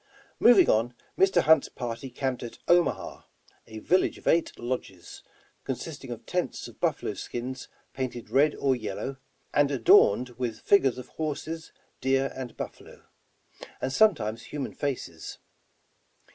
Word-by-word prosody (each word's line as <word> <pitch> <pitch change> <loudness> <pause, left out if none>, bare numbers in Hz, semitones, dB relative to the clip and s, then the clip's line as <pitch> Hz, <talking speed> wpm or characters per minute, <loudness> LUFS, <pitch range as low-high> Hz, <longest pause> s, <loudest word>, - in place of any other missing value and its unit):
Moving 235 -4 +7
on, 115 +3 +2 0.2
Mr. 190 -3 +4
Hunt's 160 -2 +5
party 120 +1 -5
camped 130 0 -3
at 120 - -7
Omaha, 175 0 +2 0.5
a 110 -1 -9
village 180 +12 +1
of - - -12
eight 165 0 +2
lodges, 120 -7 -6 0.4
consisting - - -6
of - - -7
tents - - -2
of - - -15
buffalo - - -1
skins 130 +2 -6 0.3
painted 130 -3 -5
red 145 +2 +4
or 135 -2 +1
yellow, 125 +3 -5 0.4
and 145 -1 +4
adorned 125 -2 +5
with 115 -3 -3
figures 135 -11 +4
of 125 -1 -9
horses, 160 +1 -5 0.3
deer 135 +1 +1
and 130 -3 -7
buffalo, - - -9 0.4
— - - -17
and 130 +1 -2
sometimes 135 - +2
human 145 -3 -5
faces. 130 - -4
130 Hz, 135 wpm, -27 LUFS, 120-150 Hz, 0.5 s, Moving